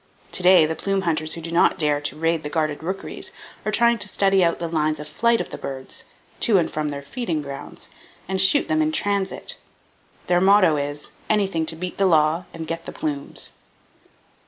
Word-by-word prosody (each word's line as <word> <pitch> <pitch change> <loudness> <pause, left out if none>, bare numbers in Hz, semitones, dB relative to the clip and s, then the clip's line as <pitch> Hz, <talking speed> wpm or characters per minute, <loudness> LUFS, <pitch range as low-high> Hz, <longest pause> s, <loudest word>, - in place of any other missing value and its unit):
To - - -2
day, 180 -2 +7
the 160 - -1
plume 195 +4 -1
hunters 155 -2 -1
who 165 - -7
do 165 +1 -6
not 170 - +3
dare 150 -2 +1
to 145 - -3
raid 165 0 +1
the 150 - -5
guarded 155 -1 -1
rookeries 190 +4 -4 0.3
are 215 - -1
trying 235 +1 +3
to 205 - +1
study 195 -2 +3
out 170 -1 +2
the 170 - -3
lines 155 -2 0
of 150 - -7
flight 235 +7 +2
of - - -4
the - - -7
birds, 130 -1 -7 0.3
to 220 -5 +4
and 170 - +1
from 155 -1 -2
their 140 -1 -6
feeding 170 - -3
grounds, 140 -1 -8 0.4
and 190 0 0
shoot 195 +10 +4
them 315 0 +1
in 310 0 +1
transit. 200 -9 -1 0.7
Their 175 0 +2
motto 190 -4 +5
is—"Anything 160 +5 -2
to 165 - 0
beat 180 +2 -5
the 195 - +4
law, 160 +1 +3
and 165 -1 -7
get 165 +1 -5
the - - -4
plumes." 145 -2 -4
165 Hz, 200 wpm, -23 LUFS, 155-195 Hz, 0.7 s, day